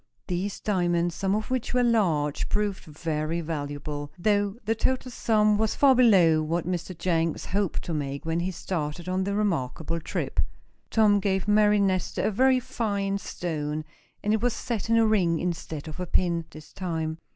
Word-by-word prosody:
These 185 +2 -3
diamonds, 175 -4 +1
some 195 +4 0
of 215 +4 -3
which 255 -1 -1
were 250 - +4
large, 170 -12 +1
proved 205 -2 -1
very 155 +1 -2
valuable, 145 -2 -4
though 205 +2 +1
the 220 - +2
total 255 +3 -1
sum 215 -3 +2
was 220 -1 +1
far 275 -2 +6
below 190 -11 +5
what 165 +2 -1
Mr. 180 0 -3
Jenks 165 -3 0
hoped 200 -2 -1
to 170 - -4
make 140 -1 -3
when 165 +1 0
he 175 +2 -1
started 170 -2 -4
on 185 +1 0
the 200 0 -1
remarkable 165 -4 -1
trip. - - -3 0.5
Tom 210 -2 +4
gave 190 -1 0
Mary 210 0 +5
Nestor 190 -3 0
a - - +2
very 260 +4 +4
fine 200 -5 -2
stone, 155 -4 -4 0.4
and 210 - +2
it 220 - +1
was 245 -1 +2
set 225 -2 -3
in 230 - +4
a 225 - +5
ring, 185 -6 +3
instead 165 -3 -4
of 155 +3 -8
a 180 - -3
pin, 170 -1 +1
this 155 -1 -13
time. 160 -3 -3
185 Hz, 175 wpm, -26 LUFS, 160-210 Hz, 0.5 s, far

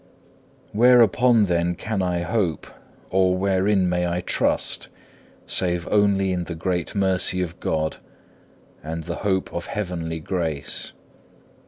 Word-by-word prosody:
Whereupon 120 0 +5
then 85 -2 +1
can 105 +2 -3
I 90 -2 0
hope, 90 -2 -1 0.5
or 95 -1 +3
wherein 95 0 +2
may 90 0 0
I 85 +1 -1
trust, - - 0 0.6
save 90 -2 -1
only 100 -2 +3
in 90 -1 -2
the 85 - -5
great 90 +1 -2
mercy 95 -2 +1
of 85 0 -7
God, 80 -1 -1 0.8
and 80 +2 -5
the 85 0 -5
hope 95 -2 -1
of 85 - -4
heavenly 85 -5 -3
grace? 80 -4 -3
90 Hz, 125 wpm, -23 LUFS, 85-100 Hz, 0.8 s, Whereupon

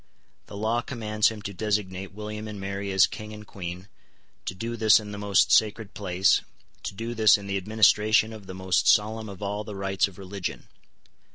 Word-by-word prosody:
The 100 - -9
law 110 +3 0
commands 110 -4 0
him 110 -2 -8
to 100 - -5
designate 95 -2 -2
William 105 +1 -6
and 105 -2 -7
Mary 100 0 -4
as 95 -2 +6
King 110 0 -8
and 105 0 -10
Queen, 90 -1 -7 0.6
to 95 - -4
do 115 +5 -4
this 110 -1 +6
in 105 -1 -8
the 105 - -6
most 100 -1 +3
sacred 110 -1 +2
place, 95 -1 +2 0.4
to - - -6
do 115 +3 -4
this 110 -3 +6
in 100 - -10
the 100 0 -1
administration 110 +2 +3
of 105 -3 -11
the 95 - -7
most 95 -1 +1
solemn 110 +1 0
of 100 0 -9
all 105 +1 -2
the 105 -1 -8
rites 95 0 0
of 95 - -14
religion. 95 -1 -6
105 Hz, 195 wpm, -26 LUFS, 95-110 Hz, 0.6 s, as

